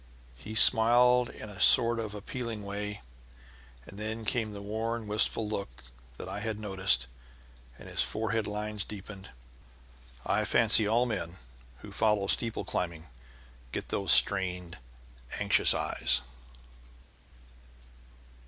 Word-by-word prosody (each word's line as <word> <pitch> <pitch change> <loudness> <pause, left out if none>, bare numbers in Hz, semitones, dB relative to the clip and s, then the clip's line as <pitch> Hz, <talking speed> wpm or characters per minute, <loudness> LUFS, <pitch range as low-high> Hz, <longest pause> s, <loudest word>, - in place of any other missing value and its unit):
He 75 - -10
smiled 120 +2 +5
in 110 - -11
a 105 -2 -12
sort 115 0 +4
of 110 -2 -6
appealing 110 +1 -6
way, 105 +1 -6 0.8
and 100 - -12
then 110 +1 -6
came 110 -1 -1
the 100 - -8
worn, 110 +2 -4
wistful 105 +1 -1
look 105 -2 -5 0.6
I - - -5
had 110 0 -4
noticed, 95 -7 +1 0.7
and - - -13
his - - +1
forehead 110 0 -2
lines 105 -1 -4
deepened. 100 -1 -11 1.0
I - - 0
fancy 105 - +4
all 115 +3 +1
men 95 -7 -5 0.4
who - - -11
follow 105 -2 0
steeple 115 +3 +2
climbing 85 -3 -4 0.6
get - - -6
those - - -1
strained, 90 -2 +3 0.6
anxious - - +3
eyes. 65 0 +1
105 Hz, 115 wpm, -28 LUFS, 100-115 Hz, 1.0 s, smiled